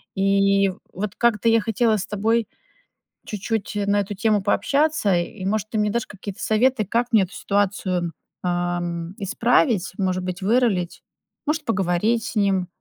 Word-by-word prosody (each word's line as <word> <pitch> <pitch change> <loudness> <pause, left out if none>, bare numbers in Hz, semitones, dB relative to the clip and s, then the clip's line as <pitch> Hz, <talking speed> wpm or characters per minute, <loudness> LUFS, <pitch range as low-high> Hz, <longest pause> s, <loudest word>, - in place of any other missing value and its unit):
И 195 0 +3 0.2
вот 195 +1 -4
как-то 235 -2 +2
я 225 0 +4
хотела 225 0 +1
с 190 - -3
тобой 220 +2 0 0.8
чуть-чуть 215 +1 -3
на 205 0 +3
эту 200 +1 -5
тему 215 0 +2
пообщаться 280 - +2
и, 180 +3 -3
может, 215 +1 -1
ты 220 - -3
мне 210 0 +2
дашь 235 +1 -1
какие-то 200 -1 -8
советы, 225 +1 +2
как 235 +5 0
мне 220 -4 +5
эту 185 - -7
ситуацию, 190 -4 -1 0.3
ам, 175 -1 -2
исправить, 225 - +2
может 185 -2 -1
быть, 180 +1 -4
вырулить, 205 -4 +1 0.4
может, 305 0 -1
поговорить 205 +3 +1
с - - -6
ним, 195 -3 +1
205 Hz, 150 wpm, -23 LUFS, 185-225 Hz, 0.8 s, мне